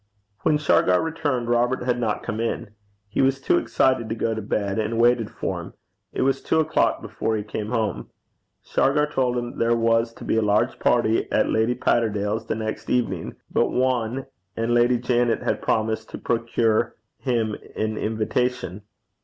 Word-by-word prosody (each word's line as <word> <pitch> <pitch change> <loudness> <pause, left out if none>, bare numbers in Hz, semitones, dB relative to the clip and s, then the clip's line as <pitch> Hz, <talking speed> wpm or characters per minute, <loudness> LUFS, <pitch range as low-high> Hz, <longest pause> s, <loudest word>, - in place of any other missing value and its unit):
When 150 - +3
Shargar 95 -11 +3
returned, 145 -7 -1
Robert 120 +1 +1
had 125 -1 0
not 110 -3 -1
come 110 - -4
in. 115 -1 -2 0.4
He 100 - -1
was 135 0 +2
too 135 - +2
excited 130 -4 +1
to 115 - -1
go 115 0 0
to 110 - -4
bed, 100 0 -1
and 110 +1 -1
waited 120 -2 +3
for - - -3
him. - - -10 0.4
It - - -1
was 135 0 +1
two 160 - +1
o'clock 160 -6 +1
before 110 0 -2
he 105 - -3
came 105 0 -5
home. 110 -3 -2 0.5
Shargar 150 +2 +2
told 130 -4 0
him 120 0 -4
there 115 0 +3
was 115 0 +2
to - - -12
be - - 0
a - - +3
large 105 0 +1
party 115 -2 +2
at - - +2
Lady 110 +3 +2
Patterdale's 110 -2 0
the - - -1
next 110 0 -4
evening 95 -9 -1 0.2
but - - +2
one, 130 0 0 0.3
and 115 +1 0
Lady 120 +1 +4
Janet 120 -1 +1
had - - -1
promised 110 0 0
to - - -7
procure 115 -1 0 0.2
him 115 -5 0 0.2
an 110 0 -1
invitation. 110 -2 -1
115 Hz, 175 wpm, -24 LUFS, 110-125 Hz, 0.5 s, Lady